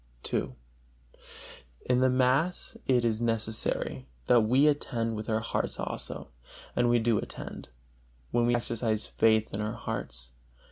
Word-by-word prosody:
II. - - -1 1.3
In 125 0 +3
the 130 0 +4
mass 130 +7 +1
it 125 -2 +3
is 110 -1 0
necessary 110 - -1 0.2
that 120 -1 +5
we 125 +6 +4
attend 115 -6 +1
with 110 +1 -5
our 110 - +2
a 110 - -3
hearts - - -2
also; - - -5 0.5
and 120 0 +3
we 120 - +5
do 115 -2 +2
attend, - - -7 0.6
when 120 0 +2
we 120 - +3
exercise 115 -2 -1
faith 110 -1 +2
in 100 - -1
our 105 +1 -2
hearts. - - -5
115 Hz, 145 wpm, -29 LUFS, 110-125 Hz, 1.3 s, that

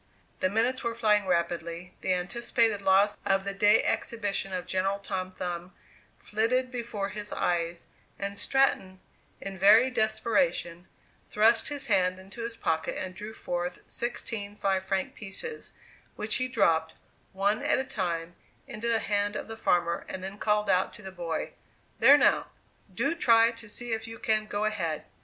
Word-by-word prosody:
The 185 - +2
minutes 240 +6 0
were 235 -1 -2
flying 210 -3 +2
rapidly, 170 0 -2
the 185 - +1
anticipated 220 +3 0
loss 195 +2 +3
of 195 0 +2
the 200 0 -3
day 205 +2 +4
exhibition 205 -4 -1
of 180 -2 -3
General 190 +2 0
Tom 190 -2 -4
Thumb 180 -1 -6 0.4
flitted 250 +4 0
before 230 -5 -3
his 210 +1 -6
eyes, 170 -1 -1 0.3
and 200 0 -4
Stratton, 205 -9 +1 0.4
in 195 -1 -6
very 220 +7 +6
desperation, 220 -6 0 0.4
thrust 225 +2 +4
his 285 -2 -4
hand 185 -6 +2
into 190 +5 -10
his 230 0 -5
pocket 160 0 -1
and 185 0 -4
drew 210 +3 -8
forth 175 0 -3
sixteen 225 -3 -4
five 190 -2 0
franc 190 0 -2
pieces, 335 - -3 0.4
which 215 +1 0
he 255 - 0
dropped, 160 -10 +2 0.4
one 200 +3 +1
at - - +2
a 265 - 0
time, 175 -9 -3 0.3
into 235 -3 -5
the 230 -1 +3
hand 205 0 0
of - - -4
the 225 - -6
farmer, 170 -5 +1
and 185 - -6
then 195 +2 -7
called 210 -1 +1
out 185 -1 +2
to 210 - -13
the 190 - -7
boy, 170 -3 -4 0.5
"There - - +8
now, - - +3 0.4
do - - 0
try 230 -8 +5
to 230 -1 -12
see 240 +2 -4
if 225 0 -3
you 225 0 -8
can 215 -1 0
go 205 0 -1
ahead." 170 -8 -2
205 Hz, 165 wpm, -28 LUFS, 185-225 Hz, 0.5 s, There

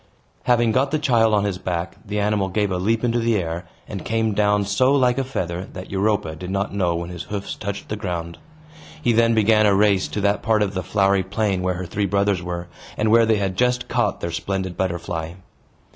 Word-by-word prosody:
Having 120 -2 +3
got 130 +4 +2
the 155 - +1
child 120 -6 +3
on 105 -1 +3
his 100 -3 -2
back, 90 -1 -3
the 105 -1 -3
animal 100 -2 +1
gave 105 +1 0
a 90 - -1
leap 110 +5 0
into 120 0 +1
the 115 -1 +1
air, 85 -1 -3 0.2
and - - -6
came 110 -1 0
down 105 0 +2
so 105 +7 +2
like 125 -1 +3
a - - +1
feather 90 -8 -3
that 90 -1 -8
Europa 100 -5 0
did 90 +3 -7
not 100 +2 -2
know 90 -4 +1
when 85 +1 -4
his 90 -2 -7
hoofs 100 -1 -4
touched 100 -1 -5
the 105 - -3
ground. 85 -5 -5 0.6
He 120 - +1
then 115 0 +4
began 110 0 +4
a 100 - +4
race 100 -2 +3
to 105 - -4
that 100 +1 +1
part 110 -2 +2
of 100 -1 -2
the 95 - -2
flowery 100 0 +2
plain 95 0 -1
where 90 0 0
her 90 +1 -5
three 100 +4 -1
brothers 100 -1 +1
were, 90 0 -5 0.3
and 110 0 +1
where 115 0 +5
they 110 -1 +3
had 95 -2 -1
just 125 +1 +1
caught 120 -5 0
their 85 - -3
splendid 95 +2 -3
butterfly. 85 -3 -3
100 Hz, 220 wpm, -22 LUFS, 90-110 Hz, 0.6 s, where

